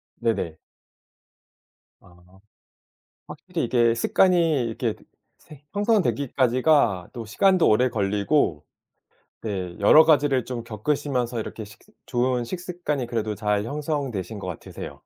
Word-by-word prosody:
네네. 85 Hz, -8 st, -2 dB, 1.4 s
아. 90 Hz, +2 st, -21 dB, 0.9 s
확실히 165 Hz, +2 st, -5 dB
이게 120 Hz, -1 st, +3 dB
습관이 165 Hz, 0 st, +2 dB
이렇게 115 Hz, -1 st, -2 dB, 0.4 s
생 150 Hz, -3 st, -16 dB
형성되기까지가 140 Hz, -, +2 dB
또 115 Hz, -2 st, -6 dB
시간도 185 Hz, -, +3 dB
오래 125 Hz, +4 st, +3 dB
걸리고 100 Hz, -, 0 dB, 0.8 s
네 95 Hz, -5 st, -4 dB
여러 155 Hz, +10 st, +7 dB
가지를 145 Hz, -5 st, +3 dB
좀 120 Hz, -2 st, -5 dB
겪으시면서 125 Hz, +1 st, -2 dB
이렇게 110 Hz, 0 st, -6 dB
식스 105 Hz, -, -18 dB
좋은 125 Hz, 0 st, 0 dB
식습관이 175 Hz, -5 st, -4 dB
그래도 110 Hz, -3 st, -2 dB
잘 105 Hz, 0 st, -1 dB
형성되신 135 Hz, -, -3 dB
것 95 Hz, -, -7 dB
같으세요. 90 Hz, -, -7 dB
120 Hz, 265 characters per minute, -24 LUFS, 105-150 Hz, 1.4 s, 여러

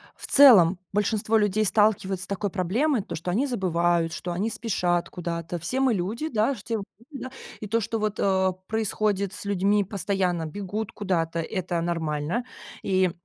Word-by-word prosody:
в -, -, -8 dB
целом, 200 Hz, -11 st, +7 dB
большинство 210 Hz, +2 st, +1 dB
людей 210 Hz, 0 st, +2 dB
сталкиваются 195 Hz, -3 st, +2 dB
с -, -, -22 dB
такой 200 Hz, +1 st, -2 dB
проблемой, 215 Hz, -, +1 dB
то, 195 Hz, -, -6 dB
что 170 Hz, +3 st, -5 dB
они 235 Hz, +10 st, +1 dB
забывают, 175 Hz, -, +1 dB
что 175 Hz, -, -4 dB
они 190 Hz, +6 st, -1 dB
спешат 180 Hz, -7 st, -1 dB
куда-то, 170 Hz, -1 st, -4 dB
все 255 Hz, +11 st, -2 dB
мы 265 Hz, -3 st, +3 dB
люди, 215 Hz, -, -2 dB
да, 225 Hz, +1 st, +1 dB
все 225 Hz, -1 st, -4 dB
мы 205 Hz, -, -4 dB, 0.3 s
люди, 275 Hz, -, -7 dB
да. 260 Hz, -, -7 dB, 0.3 s
И 210 Hz, -, -6 dB
то, 230 Hz, +3 st, +1 dB
что, 225 Hz, +2 st, -2 dB
вот, 210 Hz, -1 st, -2 dB
э, 190 Hz, -1 st, +2 dB, 0.2 s
происходит 210 Hz, -2 st, 0 dB
с -, -, -7 dB
людьми, 200 Hz, +1 st, +2 dB
постоянно 185 Hz, -3 st, -1 dB
бегут 200 Hz, +5 st, -4 dB
куда-то- 170 Hz, -5 st, -1 dB
это 175 Hz, -1 st, -2 dB
нормально 165 Hz, +5 st, -2 dB, 0.4 s
и, 185 Hz, -2 st, +2 dB
195 Hz, 170 wpm, -25 LUFS, 175-215 Hz, 0.4 s, целом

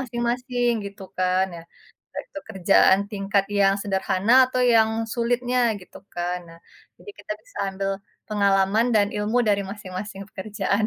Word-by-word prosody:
masing-masing, 245 Hz, 0 st, -1 dB, 0.2 s
gitu 200 Hz, 0 st, -10 dB
kan, 185 Hz, 0 st, +2 dB
ya. -, -, -8 dB, 0.5 s
Entah -, -, -5 dB
itu 295 Hz, -, -7 dB
kerjaan 190 Hz, -1 st, +4 dB
tingkat 195 Hz, -1 st, 0 dB
yang 195 Hz, -1 st, +4 dB
sederhana, 195 Hz, +1 st, 0 dB, 0.2 s
atau 255 Hz, 0 st, -1 dB
yang 220 Hz, -1 st, +5 dB, 0.2 s
sulitnya, 245 Hz, +1 st, 0 dB, 0.2 s
gitu 180 Hz, -, -13 dB, 0.2 s
kan. 175 Hz, +1 st, -2 dB
Nah, 165 Hz, -, -14 dB, 0.4 s
jadi 410 Hz, -, -11 dB
kita -, -, -5 dB
bisa -, -, -22 dB, 0.2 s
ambil 195 Hz, 0 st, -2 dB, 0.4 s
pengalaman 200 Hz, +2 st, +2 dB
dan 205 Hz, -2 st, +4 dB
ilmu 210 Hz, +4 st, 0 dB
dari 200 Hz, -1 st, +3 dB
masing-masing 195 Hz, 0 st, -7 dB
pekerjaan. 200 Hz, +1 st, -1 dB
200 Hz, 145 wpm, -24 LUFS, 195-235 Hz, 0.5 s, yang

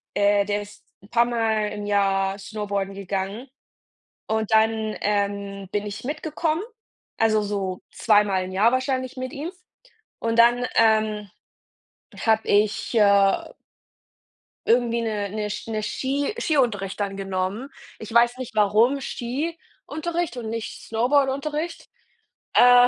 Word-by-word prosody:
äh 205 Hz, 0 st, +3 dB
der 205 Hz, 0 st, -1 dB
ist 205 Hz, -, -15 dB, 0.2 s
'n 200 Hz, -, -17 dB
paar 235 Hz, 0 st, +4 dB
Mal 225 Hz, -3 st, 0 dB
im 205 Hz, 0 st, -6 dB
Jahr 195 Hz, -1 st, +1 dB
Snowboarden 200 Hz, -2 st, -3 dB
gegangen 200 Hz, +5 st, -4 dB, 0.8 s
und 220 Hz, -1 st, -1 dB
dann, 220 Hz, 0 st, +2 dB
ähm, 200 Hz, -1 st, -1 dB
bin 205 Hz, 0 st, -1 dB
ich 210 Hz, +3 st, -6 dB
mitgekommen, 310 Hz, +3 st, -2 dB, 0.5 s
also 215 Hz, -1 st, +3 dB
so 195 Hz, -3 st, -3 dB
zweimal 205 Hz, -4 st, +3 dB
im 185 Hz, -, -7 dB
Jahr 210 Hz, +5 st, +4 dB
wahrscheinlich 255 Hz, 0 st, -1 dB
mit 255 Hz, +1 st, -5 dB
ihm 310 Hz, +3 st, -5 dB, 0.7 s
und 230 Hz, 0 st, -1 dB
dann, 240 Hz, +1 st, +5 dB
ähm, 215 Hz, -2 st, +3 dB, 1.0 s
habe 220 Hz, -1 st, +2 dB
ich, 210 Hz, +3 st, +2 dB
äh 200 Hz, -2 st, +4 dB, 1.2 s
Irgendwie 235 Hz, 0 st, +3 dB
'ne 210 Hz, -3 st, -2 dB
'ne 210 Hz, +1 st, -3 dB
Sch 205 Hz, -, -5 dB
'ne 215 Hz, -1 st, -2 dB
Ski 275 Hz, -, -1 dB
Ski -, -, -4 dB
Skiunterricht 210 Hz, -9 st, +1 dB
dann 195 Hz, -1 st, -2 dB
genommen. 195 Hz, +6 st, -3 dB, 0.3 s
Ich 220 Hz, +1 st, -8 dB
weiß 240 Hz, +1 st, +4 dB
nicht, 255 Hz, -4 st, -7 dB
warum 220 Hz, +6 st, +3 dB
Skiunterricht 315 Hz, +3 st, -4 dB
und 225 Hz, -2 st, -4 dB
nicht 230 Hz, -1 st, -5 dB
Snowboardunterricht. 280 Hz, +7 st, 0 dB, 0.6 s
Äh, 245 Hz, 0 st, +7 dB
220 Hz, 130 wpm, -24 LUFS, 205-245 Hz, 1.2 s, Äh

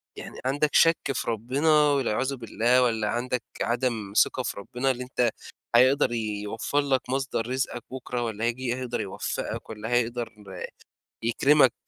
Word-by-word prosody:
يعني -, -, -9 dB
عندك 145 Hz, +3 st, +2 dB
شَك 165 Hz, 0 st, +6 dB, 0.2 s
في -, -, -3 dB
ربنا 125 Hz, +8 st, 0 dB, 0.2 s
والعياذ 135 Hz, -1 st, 0 dB
بالله 120 Hz, +1 st, +2 dB
والّا 110 Hz, -3 st, +1 dB
عندك 125 Hz, 0 st, -1 dB, 0.2 s
عدم 120 Hz, -5 st, -1 dB
ثقة 130 Hz, -, -4 dB
في -, -, -3 dB
ربنا 125 Hz, +5 st, -1 dB
اللي 125 Hz, 0 st, -4 dB
أنت 125 Hz, -1 st, +1 dB, 0.5 s
هيقدر 130 Hz, +2 st, +5 dB
يوفّر 110 Hz, +4 st, -2 dB
لك 135 Hz, -3 st, 0 dB
مصدر 135 Hz, -3 st, -1 dB
رزقك 125 Hz, -2 st, -2 dB
بُكرة 125 Hz, -1 st, -4 dB
والّا 110 Hz, 0 st, -2 dB
هييجي 125 Hz, +2 st, -1 dB
يقدر 125 Hz, -2 st, -2 dB
يوفّقك 95 Hz, -2 st, -4 dB
والّا 110 Hz, 0 st, -6 dB
هيقدر 120 Hz, -1 st, 0 dB, 0.9 s
يكرمك 135 Hz, +4 st, +4 dB
125 Hz, 140 wpm, -26 LUFS, 115-130 Hz, 0.9 s, شَك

